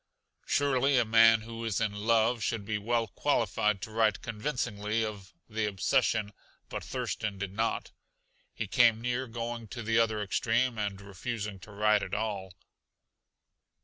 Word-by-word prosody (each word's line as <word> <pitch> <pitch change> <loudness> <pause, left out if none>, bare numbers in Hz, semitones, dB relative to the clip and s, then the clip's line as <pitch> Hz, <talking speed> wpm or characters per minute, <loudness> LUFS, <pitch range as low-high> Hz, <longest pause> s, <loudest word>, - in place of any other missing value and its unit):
Surely 140 -1 +2
a 120 - +4
man 115 0 +6
who 115 +1 -7
is 110 -5 -1
in 110 -2 0
love 115 +2 +2
should 110 -2 -2
be 105 0 -1
well 115 +2 +1
qualified 100 +2 +1
to 110 - -6
write 110 -2 +1
convincingly 110 -2 -2
of 100 -3 -7 0.2
the 110 -1 -1
obsession 105 +2 +1 0.4
but - - -5
Thurston 105 -2 -3
did 95 -1 -4
not. 115 +2 -1 0.6
He - - -4
came 115 -3 +4
near 125 +2 -2
going 115 0 -5
to 120 +2 -6
the 115 +2 +2
other 110 -2 +2
extreme 115 +3 0
and 100 -2 -2
refusing 100 +1 -5
to 90 +4 -13
write 105 0 +3
at 95 -1 -3
all. 100 -4 -3
110 Hz, 150 wpm, -30 LUFS, 105-115 Hz, 0.6 s, man